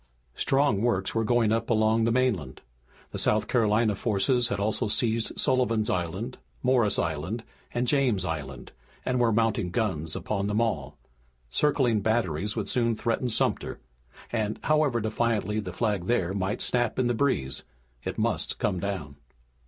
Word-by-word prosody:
Strong 135 -7 +2
works 100 -5 +1
were 115 - +1
going 115 -1 +2
up 115 +1 0
along 110 0 +3
the 115 - +2
mainland. 110 - 0 0.5
The - - -4
South 105 -1 +2
Carolina 110 -2 +2
forces 115 +4 +1
had 100 -4 -2
also 105 +1 0
seized 115 +1 0
Sullivan's 120 -5 +2
Island, 95 +8 -3 0.2
Morris 125 -5 +3
Island, 85 +8 -2 0.3
and 120 +1 0
James 125 - +2
Island 70 -6 -5 0.3
and 125 -1 +1
were 120 -2 +3
mounting 110 -4 +1
guns 85 -6 -1
upon 100 -2 -2
them 105 +1 0
all. 75 - -1 0.5
Circling 125 - +2
batteries 105 -3 0
would 110 -3 -2
soon 115 -3 +1
threaten 115 +3 -1
Sumter, 110 - 0 0.5
and, 110 -2 -1
however 150 -6 +2
defiantly 110 -1 0
the 95 -4 -5
flag 105 -4 -1
there 95 -7 +1
might 100 +1 -2
snap 120 -1 0
in 130 - +2
the 120 - +2
breeze, 110 - 0 0.4
it - - -4
must - - -1
come 90 - 0
down. 85 -8 -4
110 Hz, 150 wpm, -27 LUFS, 95-120 Hz, 0.5 s, along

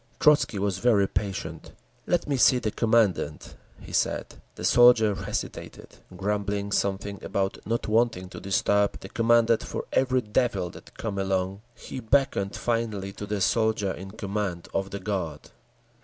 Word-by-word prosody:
Trotzky 150 -8 +4
was 95 -1 -1
very 105 -5 +3
patient. 95 0 -4 0.3
"Let 175 - +1
me 145 - 0
see 130 0 +5
the 110 -3 -2
Commandant," 105 - +1 0.3
he - - -11
said. - - -1
The - - -8
soldier 120 -3 +6
hesitated, - - -6 0.2
grumbling 100 0 -2
something 100 0 -1
about 95 0 -1
not 115 +1 -1
wanting 110 -4 +1
to - - -9
disturb 100 +1 +1
the 95 - -9
Commandant 115 0 +3
for - - -5
every 130 -1 +2
devil 105 -5 0
that - - -15
came 105 -3 -3
along. 95 0 -1
He 130 - -8
beckoned 115 -5 +1
finally 110 -5 -2
to 105 - -7
the 105 -1 -2
soldier 105 +1 +1
in 95 +1 -7
command 100 -4 -4
of 95 0 -1
the 100 - -5
guard. 90 -7 -4
100 Hz, 150 wpm, -26 LUFS, 95-115 Hz, 0.3 s, soldier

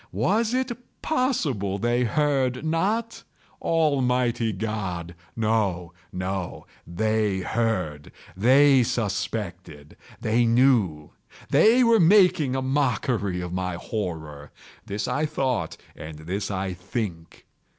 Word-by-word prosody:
Was 205 - +1
it 260 -1 0 0.3
possible 155 - 0
they 120 +4 +1
heard 135 0 0
not? 205 +9 -1 0.4
Almighty 125 -7 +1
God!—no, 95 -1 -3 0.2
no! 90 0 -4 0.2
They 105 +1 0
heard!—they 115 - +1
suspected!—they 105 -1 -3
knew!—they 125 - +2
were 230 -1 +5
making 170 -7 +4
a 130 - -1
mockery 125 -8 0
of 90 0 -5
my 90 -1 -2
horror!—this 85 +1 -6
I 150 +2 0
thought, 135 -5 -2 0.2
and 75 0 -9
this 95 +6 -4
I 95 -1 -2
think. 90 -2 -6
110 Hz, 90 wpm, -25 LUFS, 90-135 Hz, 0.4 s, were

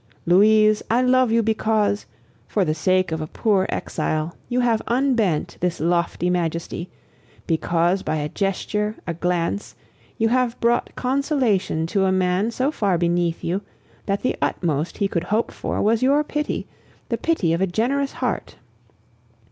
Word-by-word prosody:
Louise, 215 +4 +5
I 240 +3 +3
love 255 -1 +3
you 230 0 +3
because, 215 -1 +1 0.4
for 200 -3 +1
the 155 - +1
sake 185 +2 +1
of 160 0 -2
a 155 - -4
poor 195 +1 +1
exile, 155 +2 -2
you 250 +1 +1
have 230 -3 +2
unbent 235 - +1
this 180 -1 -1
lofty 170 +2 0
majesty, 170 0 -2 0.6
because 170 +3 +1
by - - -2
a 150 -1 -1
gesture, 210 +4 -2
a 170 - -2
glance, 175 +3 -2 0.4
you 225 0 +2
have 250 -1 +1
brought 235 +1 +1
consolation 255 - 0
to 190 +3 +1
a 190 - +2
man 185 +3 +1
so 260 +5 0
far 200 - +1
beneath 170 0 0
you 180 +4 -1 0.5
that 200 0 -1
the 255 - +1
utmost 155 -2 -1
he 200 - +1
could 170 -3 -2
hope 220 +3 0
for - - -3
was 220 +1 +2
your 280 +3 +3
pity, 300 0 -3 0.4
the - - 0
pity 195 - +1
of 170 - -1
a 190 - +2
generous 265 +9 0
heart. - - -3
200 Hz, 155 wpm, -22 LUFS, 170-230 Hz, 0.6 s, Louise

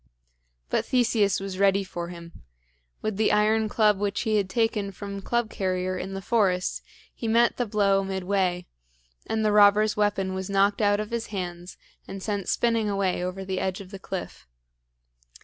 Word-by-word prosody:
But - - +1
Theseus 225 -5 +2
was 195 -1 -6
ready 200 0 +3
for 175 -2 -6
him. 170 -1 -11 0.6
With 215 -2 -2
the 220 - +2
iron 215 +1 +2
club 210 -2 +3
which 205 0 -1
he 220 -2 +1
had 195 -2 0
taken 215 -2 0
from 200 +1 -7
Club 235 +2 -1
carrier 185 -1 -1
in 190 +1 -5
the 195 - -6
forest 185 -5 +1 0.3
he 230 - -5
met 235 +2 +3
the 245 - -1
blow 200 -2 +2
midway, 190 -2 -1 0.6
and 220 -1 0
the 210 - +3
robber's 210 +1 +5
weapon 205 -2 0
was 190 0 -4
knocked 200 +2 +2
out 205 0 +3
of 215 +1 -4
his 235 -1 -3
hands 180 -3 -6 0.3
and 195 -1 -7
sent 205 -3 -2
spinning 230 -3 +1
away 195 -3 0
over 185 +1 -4
the 190 -1 -2
edge 190 -1 -2
of 195 -1 -11
the 195 - -8
cliff. 185 - -7
200 Hz, 175 wpm, -26 LUFS, 190-215 Hz, 0.6 s, robber's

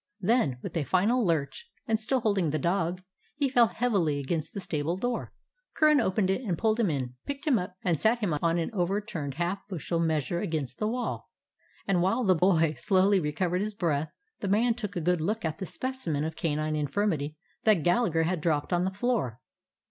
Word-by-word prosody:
Then, 190 - +2
with - - -6
a 165 - +1
final 205 - +2
lurch, 170 - -1 0.2
and 225 -1 +1
still 255 +4 0
holding 200 -7 +1
the 155 - 0
dog, 175 +2 -1 0.3
he 285 -1 +1
fell 245 -3 +5
heavily 190 -8 0
against 155 +3 -2
the - - -2
stable 165 -1 -2
door. 245 +4 -2 0.4
Curran 305 -3 +5
opened 190 -2 +1
it 195 - -1
and 190 -9 -2
pulled 220 0 +1
him 220 -5 +3
in, 130 -5 -2
picked 280 0 -5
him 270 -8 +3
up, 180 +1 -6
and 170 -5 +1
set 225 +3 +4
him 205 -8 -1
on 170 0 +2
an 170 - -1
overturned 185 - -2
half 175 +4 -1
bushel 170 -3 -3
measure 160 0 0
against 155 -9 -3
the 215 - 0
wall; 245 +2 -3 0.6
and 185 -3 +2
while 195 +8 +2
the 190 -4 +5
boy 165 -3 +3
slowly 195 0 +3
recovered 175 +3 -1
his 210 0 -3
breath, 155 -5 0 0.3
the 200 - -3
man 225 +5 +3
took 210 -4 -6
a 175 - -1
good 175 0 +1
look 215 +5 -1
at 160 +4 -3
the 190 - -4
specimen 255 - -3
of 160 +1 -3
canine 155 -1 -1
infirmity 150 0 -1 0.3
that 210 -8 +4
Gallagher 175 -3 +2
had 170 0 -1
dropped 155 +1 0
on 175 +1 +2
the - - +1
floor. 195 - -1
180 Hz, 200 wpm, -28 LUFS, 160-215 Hz, 0.6 s, fell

